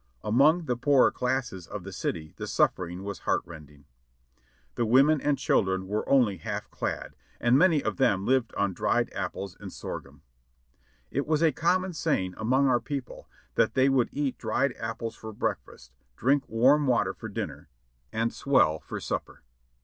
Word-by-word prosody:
Among 150 +10 +4
the 125 - 0
poorer 130 +2 +4
classes 125 -9 -2
of 105 -3 -7
the 95 +1 -8
city 80 -3 -4
the - - -5
suffering 90 +1 0
was 100 -2 -5
heart - - 0
rending. 75 -3 -13 0.9
The - - -1
women 135 +5 +5
and 145 -1 +1
children 95 -7 +1
were 105 +2 -2
only 120 -8 +4
half - - -5
clad, - - -4 0.2
and 120 +1 +3
many 160 -1 +4
of - - -2
them 100 -7 +2
lived 130 -3 +2
on 100 -2 0
dried - - 0
apples 95 -2 -4
and - - -8
sorghum. 70 +1 -8 0.9
It 140 +2 -2
was 155 +1 +2
a 160 - +5
com 175 +7 +2
mon 185 -1 -5
saying 145 - -1
among 130 +5 +2
our 125 -2 +3
people 135 +1 -6 0.2
that - - +2
they 130 +1 +4
would 130 -3 +2
eat 140 -2 -2
dried 125 +4 0
apples 115 0 -4
for 110 - -8
breakfast, 65 -9 -4 0.3
drink 135 +3 +1
warm 135 +6 +4
water 120 -4 +2
for - - -8
dinner, - - -6 0.4
and 115 +1 -1
swell 80 - +2
for - - -7
supper. - - -5
120 Hz, 170 wpm, -27 LUFS, 95-140 Hz, 0.9 s, women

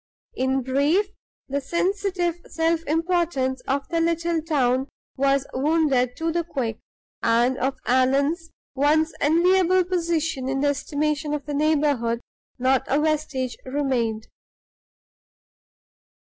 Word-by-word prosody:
In 265 - 0
brief, 290 +10 +2 0.4
the 280 +1 -2
sensitive 360 +2 -1
self 325 0 0
importance 325 -5 0
of 275 +1 -1
the 335 -1 0
little 335 0 0
town 265 -4 +1 0.3
was 275 0 +2
wounded 270 -3 +1
to 330 0 -1
the 340 +1 0
quick, 250 -9 -3 0.4
and 240 +3 +3
of 265 +1 -1
Allan's 280 +7 +2 0.2
once 305 +4 +2
enviable 365 +4 +4
position 330 -6 -1
in 270 0 -1
the 290 - +3
estimation 295 +1 -1
of 290 - -6
the 295 - -4
neighborhood 285 -6 +1 0.4
not 260 +1 +2
a 280 - +2
vestige 300 -5 -1
remained. 255 -5 -1
290 Hz, 115 wpm, -24 LUFS, 265-330 Hz, 0.4 s, enviable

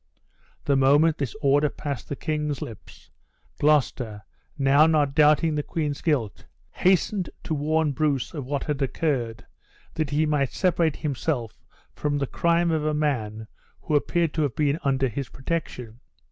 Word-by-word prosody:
The 140 - +2
moment 145 +4 +4
this 140 +5 -3
order 145 +2 +3
passed 140 -6 -6
the 145 - -2
king's 150 -1 -2
lips, 120 -9 -10 0.5
Gloucester, 125 -8 +1 0.3
now 140 +2 +5
not 150 -4 +2
doubting 155 +2 +4
the 150 - 0
queen's 150 -1 -3
guilt, 125 - -1 0.2
hastened 185 +1 +1
to - - -3
warn 155 +1 +1
Bruce 140 -3 -1
of 150 -4 -4
what 140 0 -2
had 150 -2 -3
occurred, 125 -6 -1 0.5
that 155 -3 -2
he 150 +2 +1
might 145 -3 0
separate 170 -5 +1
himself 140 -5 -3 0.3
from 145 -1 -1
the 140 - 0
crime 170 +4 +1
of 160 -2 0
a 155 0 0
man 110 -8 -1 0.4
who 155 - -1
appeared 165 +2 +1
to 160 - -1
have 140 -6 -1
been 150 0 +1
under 135 -1 +1
his 125 +2 -5
protection. 125 -6 -5
145 Hz, 155 wpm, -25 LUFS, 135-155 Hz, 0.5 s, now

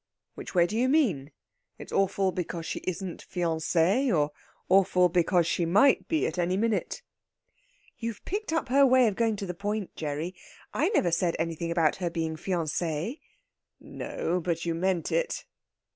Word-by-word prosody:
"Which - - -9
way 175 -1 +5
do 175 - -4
you 250 +3 +2
mean? 195 - +1 0.5
It's - - -10
awful 195 -1 +1
because 170 -1 -4
she - - -3
isn't 185 0 -4
fiancée, 175 - +1
or 150 -4 +2 0.4
awful 185 -1 +4
because 175 0 +2
she 170 - 0
might 205 +11 +4
be 320 -1 +1
at - - -3
any 180 +2 +1
minute?" 225 0 -1 1.0
"You've 230 -2 -5
picked 410 -1 -3
up 320 -5 -1
her 275 +2 +5
way 260 -2 +5
of 205 - -1
going 225 -1 +1
to 200 - -5
the 180 - -4
point, 205 +2 -4
Gerry. 155 +3 -3 0.4
I - - +1
never 185 - +2
said 170 0 +1
anything 165 0 -2
about 165 -3 +2
her 175 -2 -2
being 160 -1 -2
fiancée." 170 - -2 0.6
"No, 175 +2 -3
but 170 -1 -2
you 170 - 0
meant 175 0 -1
it." - - -1
180 Hz, 165 wpm, -28 LUFS, 165-215 Hz, 1.0 s, way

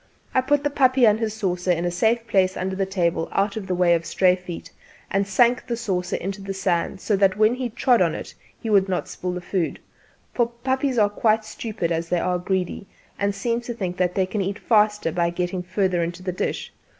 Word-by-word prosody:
I 260 - +4
put 285 +2 +1
the 290 - 0
puppy 260 -2 +4
and 215 0 +4
his 220 -2 -2
saucer 185 -4 -2
in 170 0 0
a 175 - 0
safe 225 +6 +1
place 190 -4 +2
under 190 +1 -2
the 195 0 -1
table 170 -4 0
out 200 +1 0
of 210 -3 -5
the 185 - 0
way 175 -1 +4
of 165 -1 +1
stray 180 +2 +3
feet, 180 -2 -8 0.4
and 195 0 +1
sank 240 +5 +3
the 235 -2 -2
saucer 185 -6 -2
into 195 +2 -4
the 195 0 -5
sand 185 0 -1
so 205 - 0
that 195 0 +3
when 215 +2 +4
he 250 -1 -3
trod 240 0 +2
in 170 -3 +2
it - - -7 0.3
he - - -6
would 200 -3 +3
not 180 - -1
spill 180 0 -4
the 180 - -4
food; 175 -1 -2 0.5
for 240 -2 +2
puppies 260 +2 -1
are 210 -2 +5
quite 215 +1 +1
stupid 215 -5 -4
as 165 0 -1
they 175 - +1
are 180 0 0
greedy, 190 +1 -2 0.3
and 200 0 0
seem 230 +4 -1
to 240 0 -6
think 185 -5 -3
that 180 -1 0
they 190 - +2
can 200 +2 -2
eat 195 +1 -2
faster 210 -6 +2
by 170 +1 +1
getting 180 +1 -2
further 180 0 0
into 170 +2 -4
the 185 - -2
dish. - - -3
195 Hz, 230 wpm, -23 LUFS, 180-225 Hz, 0.5 s, are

